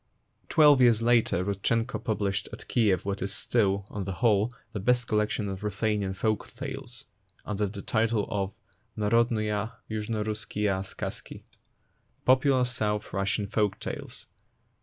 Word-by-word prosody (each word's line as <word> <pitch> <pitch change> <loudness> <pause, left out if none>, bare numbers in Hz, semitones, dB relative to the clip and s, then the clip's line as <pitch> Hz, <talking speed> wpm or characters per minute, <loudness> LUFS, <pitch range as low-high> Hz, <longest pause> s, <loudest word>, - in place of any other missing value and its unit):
Twelve 145 -4 +6
years 115 -2 +5
later 115 -6 +3
Rudchenko 115 +5 -1
pub 110 -3 0
Hshed 100 -1 0
at - - -10
Kiev 100 -7 +2
what 100 0 -2
is 100 +2 -3
still, 100 -5 +1
on 100 -2 -4
the 95 - -3
whole, 105 +2 +2 0.2
the 105 - -3
best 125 +4 +2
collection 105 -1 0
of 95 +1 -5
Ruthenian 105 -1 -1
folk 110 +2 -1
tales, 130 -1 -7 0.4
under 105 0 -1
the 100 0 -7
title 110 -1 +1
of 100 -2 -1 0.5
Narodnuiya 110 0 +1 0.2
Yuzhnorusskiya 105 -2 -1
Skazki 95 - -6 0.4
(" - - -42
Popular 130 0 +4
South 105 -4 -2
Russian 100 +1 0
Folk 105 -1 0
tales - - -7
105 Hz, 140 wpm, -28 LUFS, 100-115 Hz, 0.5 s, Twelve